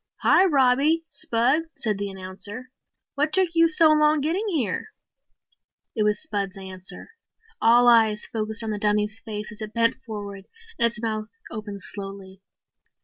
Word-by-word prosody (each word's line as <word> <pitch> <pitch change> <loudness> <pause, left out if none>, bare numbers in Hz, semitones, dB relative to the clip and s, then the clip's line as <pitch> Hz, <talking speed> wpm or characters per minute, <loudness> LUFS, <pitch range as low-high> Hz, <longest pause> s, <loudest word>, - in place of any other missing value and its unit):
"Hi, 380 - +5
Robbie, 290 +1 +3
Spud," 255 +8 0
said 210 -3 0
the 200 0 -3
announcer. 195 +6 -7 0.4
"What 295 +2 0
took 375 0 +3
you 330 0 +5
so 330 -1 +5
long 305 0 +4
getting 340 +9 -1
here?" 260 - -2 1.1
It 220 - -1
was 210 -1 +2
Spud's 200 -9 -4
answer. 185 - -5 0.5
All 240 +2 +5
eyes 220 -3 +4
focused 220 0 -2
on 220 - -3
the 210 - -3
dummy's 210 +1 +1
face 210 -2 -6
as 210 +1 -9
it 215 +1 -7
bent 230 +1 +2
forward 200 -3 -8 0.3
and 235 - +4
its 230 -1 0
mouth 215 -1 -3 0.2
opened 205 -2 -7
slowly. 195 -1 -6
220 Hz, 150 wpm, -24 LUFS, 205-275 Hz, 1.1 s, Hi